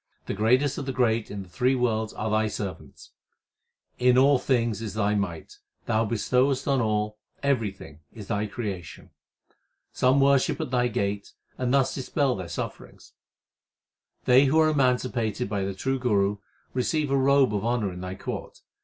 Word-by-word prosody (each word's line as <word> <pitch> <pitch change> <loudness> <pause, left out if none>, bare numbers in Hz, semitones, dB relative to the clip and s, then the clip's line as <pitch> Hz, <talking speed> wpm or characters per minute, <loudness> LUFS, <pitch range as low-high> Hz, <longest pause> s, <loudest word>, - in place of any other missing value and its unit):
The - - -3
greatest 125 +7 +2
of 140 - -6
the - - 0
great 115 -3 +1
in 100 -1 -6
the - - -16
three 130 +7 +1
worlds 110 -3 0
are 110 0 -3
Thy 110 0 +2
servants. 100 -3 -7 0.9
In 125 0 +4
all 135 0 +5
things 115 -5 0
is 110 -3 -5
Thy 105 -1 +1
might; 95 -6 -4 0.3
Thou 115 -1 +1
bestowest 125 +5 +1
on 135 -2 +2
all; 105 -1 -1 0.2
everything 100 - -2
is 105 -3 -10
Thy 105 -1 -1
creation. 100 -5 -6 0.8
Some 130 +2 +3
worship 140 -1 +3
at - - -4
Thy 125 -1 +2
gate, 100 -3 -3 0.2
and 125 -1 -1
thus 135 -1 +2
dispel 135 0 0
their 90 -3 -6
sufferings. 85 - -7 1.1
They 130 +3 +6
who 150 +4 +3
are 155 0 +5
emancipated 125 -7 0
by 100 -1 -2
the 95 0 -4
true 135 +7 -1
Guru, 105 -5 +1 0.4
receive 145 +3 0
a - - +3
robe 135 -3 +4
of 100 -1 -1
honour 115 -5 0
in 90 - -8
Thy 90 0 -5
court. - - -7
115 Hz, 165 wpm, -26 LUFS, 105-130 Hz, 1.1 s, They